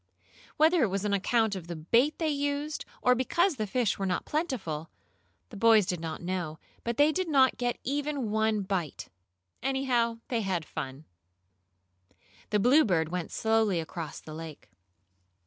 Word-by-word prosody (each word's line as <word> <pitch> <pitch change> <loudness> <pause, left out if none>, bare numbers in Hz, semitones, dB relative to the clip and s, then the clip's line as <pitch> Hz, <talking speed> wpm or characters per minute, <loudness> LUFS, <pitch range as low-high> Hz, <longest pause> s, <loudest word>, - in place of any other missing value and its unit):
Whether 320 +2 +5
it 235 - +4
was 195 +1 -2
on 205 - 0
account 220 +1 +2
of 175 -3 -7
the 170 - -5
bait 235 - +2
they 320 -2 0
used, 290 +1 -2 0.2
or 250 - +6
because 310 +7 +1
the 215 -2 -2
fish 230 0 0
were 195 - -1
not 180 - -1
plentiful, 205 - -3 0.6
the 215 - -10
boys 220 -1 +5
did 180 -1 -2
not 165 +1 -5
know, 175 -3 -3 0.3
but 235 0 -2
they 295 +2 +5
did 370 +1 -2
not 265 -4 +4
get 245 -1 0
even 280 -4 -2
one 220 -1 +1
bite. 185 -6 -3 0.5
Anyhow, 250 -3 +1
they 235 -3 0
had 185 -5 -1
fun. 135 +2 -6 1.4
The 210 - +2
Bluebird 205 - +4
went 180 -1 -4
slowly 220 -5 +2
across 165 -1 -6
the 155 - -10
lake. 155 - -9
220 Hz, 160 wpm, -29 LUFS, 180-270 Hz, 1.4 s, or